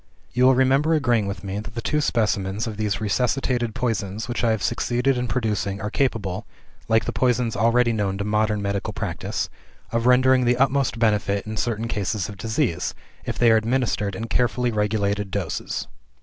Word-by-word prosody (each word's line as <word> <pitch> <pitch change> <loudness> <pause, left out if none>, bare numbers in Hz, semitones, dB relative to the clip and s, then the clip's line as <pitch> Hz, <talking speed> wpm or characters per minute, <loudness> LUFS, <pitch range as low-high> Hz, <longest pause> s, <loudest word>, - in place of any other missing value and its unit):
"You 125 +1 +3
will 130 0 +6
remember 135 +5 +3
agreeing 120 -8 +2
with 100 -2 -5
me, 100 +1 -3
that 115 +2 -9
the - - -2
two 150 +6 0
specimens 105 -5 0
of 110 -2 -4
these 105 0 -1
resuscitated 120 +1 0
poisons 110 -2 -2
which 120 -1 -3
I 115 - +3
have 110 -2 0
succeeded 125 +2 +1
in 125 0 -1
producing 105 -5 -1
are 105 +1 -4
capable 115 -10 -1 0.4
like 110 0 +3
the - - -1
poisons 125 -2 +1
already 115 +3 +3
known 100 -3 -1
to 100 - -2
modern 105 0 0
medical 100 0 -2
practice - - -3 0.4
of 115 +1 0
rendering 130 0 +5
the 120 0 +3
utmost 135 -1 +2
benefit 105 -3 +1
in 110 0 -5
certain 110 +1 -1
cases 105 -2 -2
of 105 - -8
disease, 110 - -1 0.3
if - - -3
they 120 -2 +5
are 110 - +6
administered 110 -3 0
in 115 - -4
carefully 125 +1 +1
regulated 105 -1 0
doses. 95 -4 -3
110 Hz, 180 wpm, -23 LUFS, 105-125 Hz, 0.4 s, will